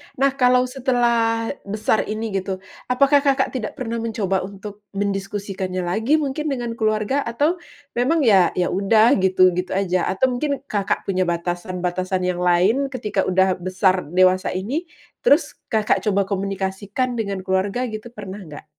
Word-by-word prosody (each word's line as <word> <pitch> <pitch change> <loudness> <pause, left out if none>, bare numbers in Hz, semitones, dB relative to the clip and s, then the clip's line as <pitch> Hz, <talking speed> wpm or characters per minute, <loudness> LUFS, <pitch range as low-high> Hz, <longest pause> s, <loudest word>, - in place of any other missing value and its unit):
Nah 275 +1 +2
kalau 250 0 +5
setelah 240 -3 +1 0.2
besar 215 +1 0
ini 215 +1 -3
gitu, 190 -1 -3 0.2
apakah 275 +3 +4
Kakak 275 -1 +1
tidak 240 -5 -4
pernah 235 -4 -3
mencoba 210 -4 -1
untuk 200 +2 -9
mendiskusikannya 195 -2 -3
lagi 220 - +1
mungkin 300 0 -1
dengan 240 -5 -3
keluarga 215 +5 0
atau 295 +10 0 0.3
memang 285 +6 +1
ya, 195 -7 +4
ya 180 - 0
udah 215 +5 +4
gitu 185 -1 +4
gitu 180 +1 -3
aja 185 -2 0
atau 255 +7 +1
mungkin 280 +2 -2
Kakak 205 -7 -1
punya 185 -2 0
batasan-batasan 180 +2 -2
yang 180 -1 -1
lain 180 +10 +3
ketika 215 -7 -2
udah 185 0 +2
besar 185 +1 +1 0.2
dewasa 185 0 +4
ini, 265 - -3 0.4
terus - - +3
Kakak 220 -1 +1
coba 200 -1 +3
komunikasikan 195 +5 -2
dengan 200 -3 -3
keluarga 190 +6 0
gitu, 220 -2 -5
pernah 200 -1 -7
nggak? 155 -7 -10
205 Hz, 145 wpm, -21 LUFS, 190-245 Hz, 0.4 s, kalau